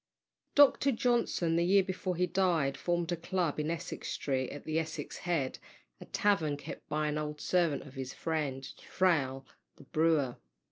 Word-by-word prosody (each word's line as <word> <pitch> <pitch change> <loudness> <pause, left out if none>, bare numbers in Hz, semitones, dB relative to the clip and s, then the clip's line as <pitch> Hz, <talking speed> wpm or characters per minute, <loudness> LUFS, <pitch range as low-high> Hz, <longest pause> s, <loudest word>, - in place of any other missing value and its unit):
Dr. 280 -1 +6
Johnson, 235 -9 +1
the 170 - +3
year 195 +2 +5
before 185 -1 -3
he 180 +2 +2
died, 175 -7 +1
formed 175 -1 -1
a - - +1
club 170 -2 -1
in 150 +1 -1
Essex 170 +1 -4
Street, 130 -2 -1
at 145 - -8
the 155 0 0
Essex 160 -2 -5
Head, 145 -7 0 0.4
a - - -9
tavern 160 -8 +1
kept 145 +2 -9
by 150 0 0
an 150 0 -1
old 150 0 -4
servant 170 -5 +1
of 135 - -13
his 130 -1 -5
friend, 140 -5 -2
Thrale, 135 -8 +1 0.3
the - - -15
brewer. 155 -5 +1
160 Hz, 170 wpm, -32 LUFS, 145-180 Hz, 0.4 s, Dr